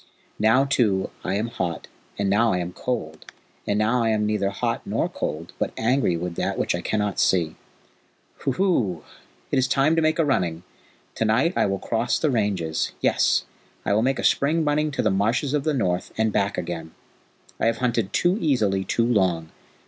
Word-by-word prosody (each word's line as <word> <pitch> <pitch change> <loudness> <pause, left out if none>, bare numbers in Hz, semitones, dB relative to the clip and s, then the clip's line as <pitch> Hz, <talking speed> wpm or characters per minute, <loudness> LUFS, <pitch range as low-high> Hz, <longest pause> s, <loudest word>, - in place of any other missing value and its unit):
Now, 115 +6 +4
too, 110 -9 +1
I 95 - -1
am 105 +3 0
hot 85 -7 -4 0.3
and 100 - 0
now 110 +4 +3
I - - +1
am 90 0 -4
cold, 100 -12 -4 0.4
and 100 - +1
now 115 +4 +2
I 115 - +2
am 105 -1 +1
neither 105 -2 0
hot 100 - -2
nor - - -1
cold, 80 +3 -5
but - - -1
angry 115 -6 +1
with 90 +1 -4
that - - -1
which - - 0
I - - -2
cannot 105 -2 -1
see. 85 -4 +2 0.8
Huhu! 130 - 0 0.5
It - - +3
is 130 - +2
time 140 +5 +3
to 165 - +2
make 155 0 +2
a 165 - +3
running! 90 - 0 0.5
To 115 - -1
night 125 +11 +2
I - - +2
will 95 0 -1
cross 115 +4 0
the 155 - +1
ranges; 100 -9 -1
yes, - - +2 0.4
I - - +2
will 105 - +3
make 135 +3 +1
a - - -4
spring 155 +3 +2
running 150 +1 +1
to 140 - -2
the - - +2
Marshes 115 +9 +1
of 145 -2 0
the 155 - +1
North, 90 -7 -1
and 110 -1 +1
back 100 0 0
again. 85 -2 -5 0.6
I - - +2
have 115 0 +1
hunted 120 -5 0
too 180 +4 +2
easily 110 - +1
too 115 +5 0
long. 90 -8 +1
110 Hz, 195 wpm, -24 LUFS, 95-130 Hz, 0.8 s, Now